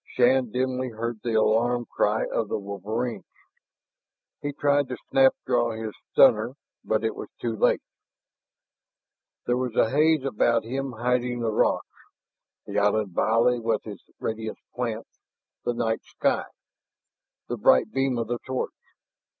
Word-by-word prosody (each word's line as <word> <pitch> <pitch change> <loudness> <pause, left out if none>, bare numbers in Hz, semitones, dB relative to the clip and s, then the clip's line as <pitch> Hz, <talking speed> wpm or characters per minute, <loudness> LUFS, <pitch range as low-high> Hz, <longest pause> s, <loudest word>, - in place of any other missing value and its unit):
Shann 125 0 +4
dimly 130 +1 -1
heard 115 0 -4
the 115 -2 -1
alarm 120 +2 +2
cry 105 0 +1
of 110 - -1
the - - -1
wolverines. 105 +4 -4 1.2
He 145 -1 -2
tried 145 0 +2
to 125 - -4
snap 265 0 +5
draw 120 -1 +1
his 110 -1 -5 0.2
stunner, 120 -1 +5 0.3
but 110 0 0
it 110 - -1
was - - -7
too 115 -2 -2
late. - - +2 1.6
There 120 - +1
was 125 -2 -2
a 110 - +3
haze 155 +1 +3
about 115 -2 +2
him 135 +3 -3
hiding 125 +1 0
the 115 -1 0
rocks, - - +2 0.8
the - - -1
island 105 0 +2
valley 115 +5 +3
with 115 -2 -1
its 105 -3 -9 0.2
radiant 110 0 -4 0.2
plants, 115 -2 -4 0.5
the 120 - 0
night 115 -1 0
sky, - - 0 1.0
the - - -3
bright 65 - +4
beam 135 -2 0
of 115 - -1
the 120 +1 -2
torch. 130 0 -3
120 Hz, 140 wpm, -26 LUFS, 110-125 Hz, 1.6 s, snap